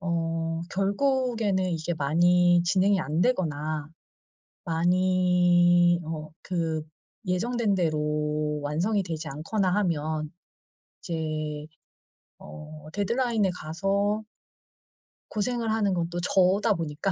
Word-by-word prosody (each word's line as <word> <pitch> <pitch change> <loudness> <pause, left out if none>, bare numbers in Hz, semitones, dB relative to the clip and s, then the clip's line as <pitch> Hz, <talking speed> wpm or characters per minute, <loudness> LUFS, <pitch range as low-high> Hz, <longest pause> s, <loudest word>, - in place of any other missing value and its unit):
어 165 -2 -2
결국에는 220 -1 +1
이게 165 0 -2
많이 175 +4 +3
진행이 190 +2 +3
안 155 0 -1
되거나 155 - -1 0.8
많이 175 0 +3
어 155 -1 -6
그 165 -3 -2 0.4
예정된 210 +3 0
대로 150 -2 -1
완성이 185 +8 0
되지 160 -2 -5
않거나 180 +6 -1
하면 155 -5 -1 0.7
이제 155 -2 -4 0.7
어 155 0 -11
데드라인에 220 0 +1
가서 200 +7 -1 1.1
고생을 230 +1 -1
하는 210 -3 +1
건 170 -1 -1
또 175 0 -4
저다 195 +4 +3
보니까 165 +3 -2
175 Hz, 200 characters per minute, -26 LUFS, 155-195 Hz, 1.1 s, 많이